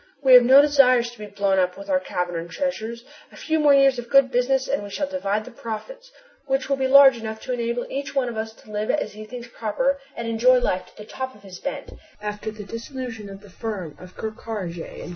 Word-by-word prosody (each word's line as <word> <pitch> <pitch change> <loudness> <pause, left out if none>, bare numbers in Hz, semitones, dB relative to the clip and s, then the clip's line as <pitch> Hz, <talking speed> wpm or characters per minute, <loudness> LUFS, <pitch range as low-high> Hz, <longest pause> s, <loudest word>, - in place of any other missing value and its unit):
We 260 -1 +6
have 250 - +11
no 265 +4 +7
desire 275 -4 +5
to 240 -1 -8
be 210 - -7
blown 200 -1 +1
up 180 -1 0
with 200 0 -10
our 185 -2 +2
cavern 180 -1 -3
and 170 - -10
treasures! 235 -1 -4 0.3
A - - -15
few 320 0 -1
more 295 -1 +5
years 270 -2 +4
of 240 -1 -8
good 275 -1 +5
business 260 +2 +1
and - - -1
we 205 - -8
shall 285 - -2
divide 215 -7 -2
the 255 - -10
profits, - - -8 0.4
which 270 0 0
will 275 - +1
be 265 -1 +1
large 270 -2 +8
enough 220 -1 -6
to 255 - -4
enable 235 0 -2
each 275 +1 -5
one 265 -2 +1
of 235 - -5
us 220 0 -4
to 215 - -17
live 210 +1 -3
as 215 -8 -1
he 215 +1 -9
thinks 240 +2 -9
proper 260 +5 -1 0.2
and 235 - -4
enjoy 240 +3 +4
life 185 -7 -1
to - - -22
the 210 - -10
top 260 +3 -6
of 205 - -19
his 185 -2 -11
bent 280 0 -5 0.3
after 210 +1 -5
the 215 -1 -8
dissolution 230 -1 -7
of 195 0 -10
the 205 - -15
firm 195 -8 -5
of 180 0 -13
Ker 220 - -3
Karraje 205 -6 -6
and - - -10
Co. - - -8
235 Hz, 250 wpm, -23 LUFS, 210-265 Hz, 0.4 s, have